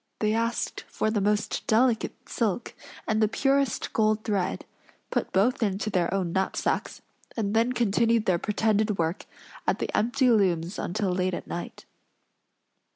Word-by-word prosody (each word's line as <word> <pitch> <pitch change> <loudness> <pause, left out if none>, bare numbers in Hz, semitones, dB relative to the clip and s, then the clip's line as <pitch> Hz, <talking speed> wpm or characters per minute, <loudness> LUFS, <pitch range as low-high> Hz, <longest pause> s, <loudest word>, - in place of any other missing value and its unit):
They 215 0 +1
asked 230 +1 -1
for 215 - -1
the 210 -2 0
most 210 +1 0
delicate 230 +1 +1
silk 230 0 -1 0.3
and 220 0 +1
the 215 - +5
purest 275 +2 0
gold 215 0 +2
thread; 200 -4 -1 0.5
put - - -1
both 220 +8 +2
into 210 0 0
their 180 -3 +1
own 185 -3 -1
knapsacks; 190 0 -1 0.3
and 210 -2 -1
then 230 +2 +3
continued 230 -1 +2
their 180 -2 +2
pretended 210 0 +1
work 165 +3 -2 0.4
at - - +2
the - - -3
empty 250 +3 +3
looms 185 -5 +1
until 195 +1 -1
late 180 0 0
at - - -7
night. 175 - -7
215 Hz, 150 wpm, -27 LUFS, 190-230 Hz, 0.5 s, the